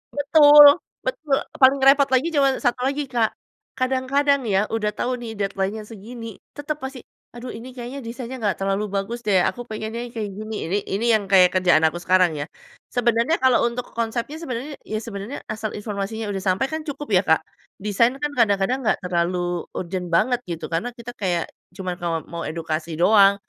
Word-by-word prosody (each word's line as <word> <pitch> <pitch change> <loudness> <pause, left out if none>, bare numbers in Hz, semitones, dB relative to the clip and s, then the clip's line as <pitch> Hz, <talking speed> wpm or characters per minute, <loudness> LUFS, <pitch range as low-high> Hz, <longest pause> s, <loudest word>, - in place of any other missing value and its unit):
Betul, 290 0 +8 0.4
betul, 315 - -1 0.2
paling 265 +1 +6
repot 275 +1 +6
lagi 260 +6 +3
cuma 275 -3 +3
satu 245 0 +1
lagi, 280 +2 -1
Kak, 230 -3 +1 0.4
kadang-kadang 265 +1 +1
ya, 195 0 +2
udah 215 -2 0
tau 255 +1 -1
nih, 230 -2 -7
deadline-nya 200 +1 -2
segini. 225 +1 -9 0.2
Tetep 295 +1 -4
pasti, 265 -2 -7 0.3
aduh 245 +1 -7
ini 250 +2 -9
kayaknya 250 +2 -6
desainnya 250 +1 -7
nggak 205 -4 0
terlalu 195 +2 -1
bagus 200 +4 -3
deh, 190 -3 +4
aku 245 0 -2
pengennya 220 +2 -5
yang 240 - -15
kayak 210 -3 -3
gini. 215 +3 -6 0.2
Ini 200 - +2 0.2
ini 220 +4 -1
yang 210 -3 +2
kayak 185 -2 +6
kerjaan 175 -3 +4
aku 160 +2 +2
sekarang 185 0 +3
ya. 145 - -4 0.4
Sebenarnya 235 +4 +1
kalau 250 -2 +4
untuk 240 +1 -5
konsepnya, 235 +6 -3
sebenarnya 275 -1 -6
ya 215 - -2
sebenarnya 210 +5 -7
asal 215 0 -4
informasinya 210 +1 -4
udah 195 -1 -4
sampai, 185 +9 +1
kan 315 0 -3
cukup 290 0 -5
ya, 185 -2 +5
Kak? 160 0 +3 0.3
Desain 210 +5 +1
kan 295 +2 -3
kadang-kadang 230 -1 +2
nggak - - +2
terlalu 175 0 -1
urgent 180 0 -4
banget 215 +9 +2
gitu. 170 -1 -5
Karena 235 +9 -2
kita 240 0 -8
kayak, 175 -4 -1 0.2
cuman 180 -2 -5
ka 165 -2 -2
mau 170 0 -4
edukasi 160 0 -4
doang. 200 +3 +5
225 Hz, 180 wpm, -22 LUFS, 195-255 Hz, 0.4 s, Betul